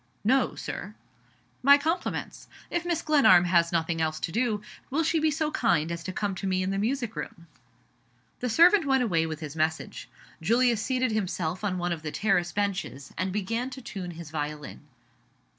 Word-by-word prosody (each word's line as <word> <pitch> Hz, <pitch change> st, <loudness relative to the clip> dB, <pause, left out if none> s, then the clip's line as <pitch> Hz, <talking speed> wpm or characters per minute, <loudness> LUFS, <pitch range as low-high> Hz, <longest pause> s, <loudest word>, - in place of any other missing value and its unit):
"No, 260 Hz, +6 st, +2 dB
Sir." -, -, -6 dB, 0.7 s
"My 280 Hz, +2 st, +8 dB
compliments. 325 Hz, +5 st, -3 dB, 0.2 s
If 345 Hz, 0 st, -1 dB
Mrs. 340 Hz, -2 st, -1 dB
Glenarm 265 Hz, -, +6 dB
has 170 Hz, -1 st, +3 dB
nothing 165 Hz, -1 st, 0 dB
else 155 Hz, -1 st, -1 dB
to 165 Hz, -, -2 dB
do, 220 Hz, -1 st, 0 dB, 0.3 s
will 310 Hz, +5 st, +1 dB
she 325 Hz, +1 st, +2 dB
be 310 Hz, 0 st, +3 dB
so 305 Hz, +1 st, -1 dB
kind 170 Hz, -, +1 dB
as 170 Hz, 0 st, -5 dB
to -, -, -3 dB
come 200 Hz, +1 st, -2 dB
to 195 Hz, -, -3 dB
me 185 Hz, 0 st, +1 dB
in 190 Hz, -, -1 dB
the 195 Hz, -, -1 dB
music 240 Hz, +1 st, -1 dB
room?" 170 Hz, -, -7 dB, 0.9 s
The 250 Hz, -, -2 dB
servant 340 Hz, -, +5 dB
went 265 Hz, -2 st, +3 dB
away 165 Hz, -8 st, +1 dB
with 155 Hz, 0 st, -6 dB
his 150 Hz, -1 st, -6 dB
message. 160 Hz, 0 st, -2 dB, 0.3 s
Julius 235 Hz, +4 st, +3 dB
seated 255 Hz, -1 st, 0 dB
himself 185 Hz, -4 st, -2 dB
on 190 Hz, -3 st, -1 dB
one 175 Hz, 0 st, -1 dB
of 165 Hz, -2 st, -3 dB
the 155 Hz, -, -4 dB
terrace 180 Hz, -3 st, +1 dB
benches, 195 Hz, -9 st, -3 dB
and 185 Hz, +2 st, -2 dB
began 230 Hz, +6 st, -2 dB
to 265 Hz, 0 st, -8 dB
tune 190 Hz, -6 st, -6 dB
his 165 Hz, -2 st, -9 dB
violin. 150 Hz, -1 st, -5 dB
200 Hz, 185 wpm, -27 LUFS, 170-255 Hz, 0.9 s, My